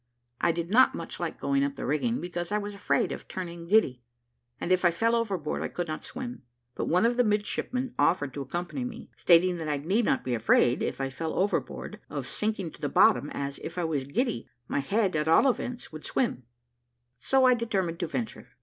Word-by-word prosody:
I - - +3
did 170 +2 -4
not 255 +4 +6
much - - -6
like - - -3
going 275 0 +1
up 280 0 -1
the - - -5
rigging, 230 - 0
because 175 +1 -4
I 210 - +2
was 205 0 -4
afraid 200 - 0
of - - -6
turning 170 -2 -6
giddy, 170 - +3 0.6
and 180 - -2
if 185 0 +3
I 175 - +6
fell 225 +7 +1
overboard 195 -10 -1
I - - -1
could 175 -1 -4
not 155 - -4
swim; 245 -1 -6 0.3
but - - -3
one 180 +6 +3
of 240 +1 +2
the 245 - +5
midshipmen 235 +4 -1
offered 145 -6 +2
to 140 - -4
accompany 175 - -4
me, 250 - -7
stating 175 +1 +4
that 160 -2 -4
I 145 - +1
need 190 +11 +1
not 135 - +1
be 125 - -2
afraid, 120 +2 +3
if - - -2
I 135 0 -2
fell 160 +4 -3
overboard, 200 +3 -1
of - - -4
sinking 210 -6 -2
to - - -16
the 145 - -1
bottom, 145 +1 +4
as, 140 0 -4
if 165 - -7
I 175 - 0
was 150 -5 -1
giddy, 195 - -1 0.2
my - - 0
head 195 +6 +1
at 150 0 0
all 165 +12 +6
events 245 -1 -2
would 155 -1 -9
swim; 180 - -1 0.7
so 260 - +3
I 255 - +7
determined 195 -8 -1
to 170 - -1
venture. 230 +6 -4
180 Hz, 215 wpm, -28 LUFS, 155-230 Hz, 0.7 s, I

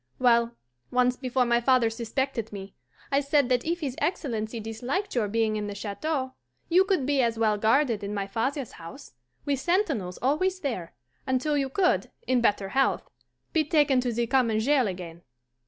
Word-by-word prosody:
Well, 235 -1 +3 0.3
once 250 0 +2
before 255 -1 0
my 240 0 +2
father 245 -2 +3
suspected 235 0 -3
me, 195 -1 -8 0.4
I 275 - +4
said 280 -2 +2
that 250 -1 +2
if 340 +2 -2
his 270 -4 -3
Excellency 230 - -2
disliked 245 - -3
your 230 -4 +1
being 220 0 0
in 210 -1 -3
the 205 - -5
Chateau, 260 +7 -3 0.4
you 365 +3 +5
could 380 -9 +1
be 280 -1 +2
as 230 -2 0
well 220 -2 +2
guarded 225 -1 +2
in 200 - -4
my 200 -1 -2
father's 245 +5 -2
house, 165 -4 -11 0.3
with 280 -2 0
sentinels 290 - 0
always 370 +8 0
there, 210 - -4 0.3
until 260 +3 +1
you 275 -2 0
could, 360 +6 +1 0.2
in 255 -2 +2
better 205 -4 +1
health, 270 +6 0 0.4
be 320 - +3
taken 290 -4 +3
to 245 -1 -1
the 235 +1 0
common 235 -3 +2
jail 260 +1 +3
again. 175 -3 -7
250 Hz, 175 wpm, -27 LUFS, 220-280 Hz, 0.4 s, you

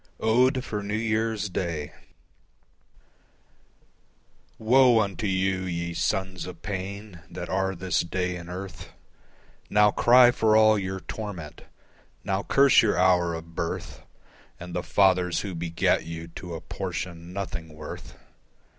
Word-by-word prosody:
Ode 125 +3 +3
for 105 -1 -4
New 105 +1 -3
Year's 110 -1 -1
Day 85 -5 -4 2.6
Woe 125 +1 +5
unto 100 -1 -1
you, 95 0 +1
ye 85 -1 -3
sons 95 -1 -2
of 90 - -10
pain 100 0 -6
that 90 - -7
are 95 0 0
this 90 -1 -1
day 90 +1 -2
in 85 0 -9
earth, 95 +1 -8 0.8
Now 105 0 +5
cry 125 +2 +6
for 110 -3 +3
all 110 -1 +5
your 95 -1 -4
torment: 95 -10 -7 0.6
now 95 0 -1
curse 135 +5 +5
your 110 - +1
hour 90 -2 +3
of 80 0 -9
birth 85 0 -4 0.6
And 90 0 -8
the 90 - -1
fathers 90 -2 +2
who 100 -2 -5
begat 85 0 0
you 80 0 -7
to 85 0 -8
a 80 - -7
portion 85 -2 -6
nothing 90 -4 -5
worth. 75 - -9
95 Hz, 130 wpm, -26 LUFS, 85-105 Hz, 2.6 s, cry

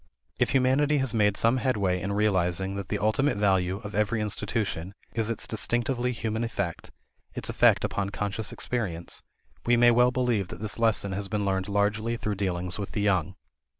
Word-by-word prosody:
If - - +2
humanity 135 +3 +3
has 135 -3 0
made 105 -3 +2
some 115 +3 +3
headway 100 -8 0
in 100 +3 -2
realizing 95 -2 +1
that 100 -1 -5
the 105 - 0
ultimate 110 +5 +1
value 95 -2 +1
of 105 0 -7
every 105 +2 +1
institution 100 -3 -2 0.2
is 115 -1 -1
its 115 - -2
distinctively 120 +3 0
human 110 -1 -2
effect 100 -7 -3 0.5
its - - -4
effect - - +4
upon 100 -1 -1
conscious 105 +1 -3
experience 95 -9 -3 0.4
we 120 0 +3
may 120 0 +6
well 125 +1 +5
believe 125 -6 0
that - - -9
this 110 +2 -4
lesson 110 -3 +2
has 100 +1 -3
been 105 -2 -1
learned 95 0 -1
largely 105 +3 0
through 105 -2 -2
dealings 90 -2 -2
with 100 - -5
the 105 - -1
young. 95 -2 +1
105 Hz, 180 wpm, -27 LUFS, 95-115 Hz, 0.5 s, may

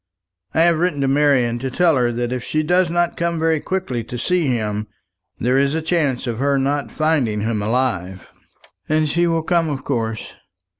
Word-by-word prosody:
I 160 - +4
have 170 -1 +4
written 170 -5 0
to 135 - +1
Marian 135 -4 +2
to 135 +2 -3
tell 165 +4 +3
her 120 -2 +2
that 120 +1 -2
if 125 -2 -4
she 155 +3 -1
does 180 +2 +2
not 175 0 0
come 170 0 -1
very 160 -1 +1
quickly 130 -10 -3
to 120 - -6
see 175 +5 0
him, 110 -4 -1 0.5
there 125 +3 +2
is 140 +2 +1
a 160 - -1
chance 155 -7 0
of 120 -2 -3
her 140 +1 +2
not 140 +1 -1
finding 140 -10 0
him 110 -1 -1
alive." 105 -5 -2 0.6
"And 155 0 +2
she 170 +4 +1
will 165 -1 0
come 170 -1 +1
of 140 -2 -4
course." 115 -5 -3
140 Hz, 195 wpm, -20 LUFS, 120-160 Hz, 0.6 s, I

